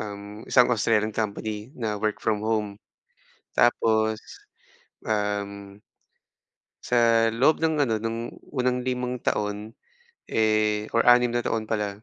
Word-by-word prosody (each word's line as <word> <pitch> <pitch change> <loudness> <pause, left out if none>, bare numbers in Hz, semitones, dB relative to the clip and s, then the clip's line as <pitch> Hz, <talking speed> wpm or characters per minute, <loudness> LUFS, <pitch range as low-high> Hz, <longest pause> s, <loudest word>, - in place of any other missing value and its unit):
um, 105 0 -8
isang 125 -1 +5
Australian 110 -2 +1
company 105 +1 -3
na 110 -4 -2
work 105 0 -1
from 105 -1 0
home. 105 -2 -1 0.8
Tapos, 110 -2 +2 0.9
um 100 -2 -3 1.0
sa 115 -2 +3
loob 130 +8 +2
ng 155 -2 +2
ano 110 - +1
ng 115 0 -2 0.3
unang 125 -2 0
5 125 -1 -3
taon, 105 +1 -2 0.6
eh 110 -1 +1
or 115 - +3
6 120 0 +6
na 120 0 -1
taon 110 -1 -1
pala. 105 -2 -3
110 Hz, 120 wpm, -25 LUFS, 105-120 Hz, 1.0 s, 6